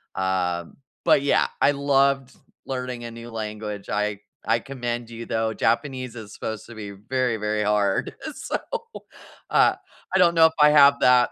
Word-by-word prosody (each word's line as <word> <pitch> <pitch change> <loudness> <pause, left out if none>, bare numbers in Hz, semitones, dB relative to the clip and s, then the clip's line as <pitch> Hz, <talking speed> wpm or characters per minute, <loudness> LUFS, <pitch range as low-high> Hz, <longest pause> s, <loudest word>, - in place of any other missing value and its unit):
um, 90 -2 -1 0.3
but - - +4
yeah. 140 - +2
I - - +5
loved 140 -1 +1 0.3
learning 125 -2 -4
a 115 - -6
new 115 +1 -10
language. 105 -2 -6
I 105 -1 -1 0.3
I 115 +1 +2
commend 120 -2 -5
you 115 0 -8
though, 110 -1 -1
Japanese 130 +1 -1
is 110 -2 -9
supposed 110 -1 -5
to 120 - -11
be 105 -2 -7
very, 120 +4 -1
very 105 0 -1
hard, 105 -2 +1
uh, 310 - -4
so, - - -3 0.9
uh, - - +4 0.4
I - - +6
don't 170 -2 +4
know 165 0 +7
if 160 - +3
I 150 - +8
have 140 -1 +6
that 125 -1 +5
115 Hz, 170 wpm, -24 LUFS, 105-135 Hz, 0.9 s, I